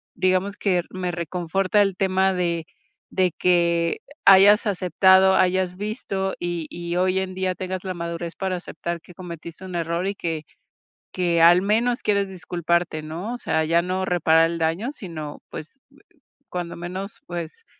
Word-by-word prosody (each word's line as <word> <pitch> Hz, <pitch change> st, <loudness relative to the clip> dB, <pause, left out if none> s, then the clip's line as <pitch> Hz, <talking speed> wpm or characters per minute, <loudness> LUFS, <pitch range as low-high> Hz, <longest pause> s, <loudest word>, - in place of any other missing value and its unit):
digamos 185 Hz, +2 st, +1 dB
que 180 Hz, -4 st, +1 dB
me 185 Hz, -1 st, -3 dB
reconforta 180 Hz, +4 st, 0 dB
el 195 Hz, -2 st, -1 dB
tema 190 Hz, 0 st, +2 dB
de 170 Hz, -3 st, -1 dB, 0.5 s
de 185 Hz, -2 st, +2 dB
que 170 Hz, -2 st, +2 dB, 0.3 s
hayas 200 Hz, +3 st, +7 dB
aceptado, 190 Hz, 0 st, +4 dB
hayas 185 Hz, 0 st, +1 dB
visto 195 Hz, -2 st, -3 dB
y 175 Hz, -2 st, -3 dB
y 170 Hz, 0 st, -5 dB
hoy 185 Hz, +1 st, +2 dB
en 190 Hz, -1 st, -3 dB
día 185 Hz, 0 st, -1 dB
tengas 185 Hz, 0 st, -4 dB
la 185 Hz, -, -2 dB
madurez 170 Hz, 0 st, -5 dB
para 190 Hz, -1 st, -2 dB
aceptar 170 Hz, -1 st, -5 dB
que 180 Hz, -, -16 dB
cometiste 170 Hz, 0 st, -9 dB
un 185 Hz, -1 st, -7 dB
error 170 Hz, +2 st, -1 dB
y 200 Hz, -, -2 dB
que 165 Hz, -4 st, -3 dB, 0.7 s
que 170 Hz, -2 st, +1 dB
al 175 Hz, +2 st, +7 dB
menos 235 Hz, +4 st, +1 dB
quieres 200 Hz, -2 st, +1 dB
disculparte, 170 Hz, -3 st, -1 dB
¿no? 170 Hz, +9 st, -5 dB
O -, -, -6 dB
sea, 160 Hz, -8 st, 0 dB
ya 170 Hz, +2 st, +3 dB
no 185 Hz, +1 st, -1 dB
reparar 165 Hz, -2 st, +4 dB
el 170 Hz, -, -4 dB
daño, 165 Hz, +9 st, 0 dB
sino, 165 Hz, -, -8 dB
pues, 160 Hz, -, -9 dB, 0.7 s
cuando 175 Hz, -1 st, -5 dB
menos, 185 Hz, +4 st, -6 dB
pues, 175 Hz, -, -6 dB
180 Hz, 160 wpm, -23 LUFS, 170-190 Hz, 0.7 s, hayas